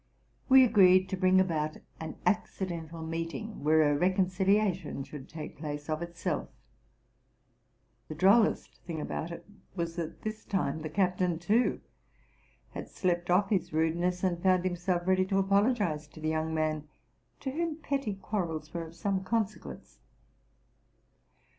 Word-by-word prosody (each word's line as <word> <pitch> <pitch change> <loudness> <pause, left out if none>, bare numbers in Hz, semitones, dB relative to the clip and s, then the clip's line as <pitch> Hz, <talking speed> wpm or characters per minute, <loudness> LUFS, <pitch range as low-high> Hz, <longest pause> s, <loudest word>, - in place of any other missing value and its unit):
We 265 0 +9
agreed 185 -5 +5
to 190 - -1
bring 185 0 +4
about 155 -4 0 0.2
an 160 0 -6
acci 205 -2 0
dental 165 -1 -6
meeting, 165 +5 -5
where 155 +1 +5
a 145 -1 +3
reconciliation 185 -1 +1
should 135 -1 -10
take 155 -2 -8
place 145 0 -5
of 155 +1 -1
itself. 170 -1 -3 1.6
The 155 - -6
drollest 200 +7 +3
thing 165 -2 -5
about 160 - -4
it 170 - -8 0.3
was, 170 -1 -3
that 165 -2 -5
this 215 0 -4
time 160 -6 -1
the 155 - -4
captain, 180 0 +1
too, 210 +8 +1 0.9
had - - -7
slept 175 -2 -1
off 195 +3 +3
his 190 -6 0
rudeness, 175 +3 0
and 175 -2 0
found 185 -1 +3
himself 175 -1 -1
ready 185 0 +3
to 195 - +1
apologize 195 - +2
to 150 - -14
the 155 0 -1
young 160 0 -1
man, 155 -1 -1 0.5
to 265 - -3
whom 330 +2 -2
petty 275 -9 -2
quarrels 165 -6 -4
were 170 -1 -4
of 165 - -14
some 195 0 -1
consequence. 215 +1 -3
180 Hz, 145 wpm, -30 LUFS, 160-195 Hz, 1.6 s, We